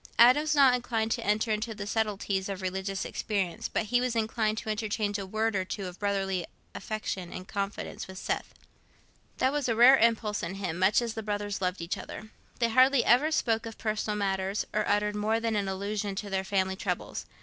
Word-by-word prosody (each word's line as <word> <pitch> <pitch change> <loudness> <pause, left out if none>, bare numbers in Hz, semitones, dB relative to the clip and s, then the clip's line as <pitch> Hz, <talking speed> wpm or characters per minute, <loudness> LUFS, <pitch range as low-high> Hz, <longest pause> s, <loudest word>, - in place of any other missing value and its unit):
Adam 250 +5 +7
was 310 0 0
not 275 -3 +6
inclined 230 -3 -1
to 235 - -1
enter 215 +2 +1
into 215 +1 -2
the 205 -1 -5
subtleties 205 -2 -1
of 195 -1 -5
religious 190 +1 -2
experience, 195 -5 -2
but - - 0
he 245 +3 +1
was 250 -2 -1
inclined 220 -1 0
to - - -5
interchange 210 -1 -1
a 195 - -5
word 220 +2 0
or 190 - +1
two 195 +1 -5
of 180 0 -8
brotherly 195 -3 0 0.3
affection 195 -5 -4
and 185 +1 -7
confidence 200 0 -4
with 190 0 -10
Seth. - - -3 0.8
That 260 - +2
was 290 -4 0
a 230 - +2
rare 250 +4 +8
impulse 220 -2 +2
in 175 +3 -4
him, 180 -4 -3
much 195 +5 +4
as 230 -2 -3
the 225 - -4
brothers 205 -1 -3
loved 180 -1 -1
each 170 - -3
other. 215 0 -9 0.3
They 235 -1 +2
hardly 260 +2 +5
ever 255 +7 +5
spoke 225 -6 +1
of 225 - -9
personal 215 -1 -2
matters, 195 0 -1
or 215 0 0
uttered 210 0 +1
more 215 +2 +1
than 230 -1 -1
an 200 -2 0
allusion 200 +1 -2
to 200 0 -5
their 190 0 0
family 190 -1 0
troubles. - - -4
210 Hz, 205 wpm, -29 LUFS, 195-225 Hz, 0.8 s, rare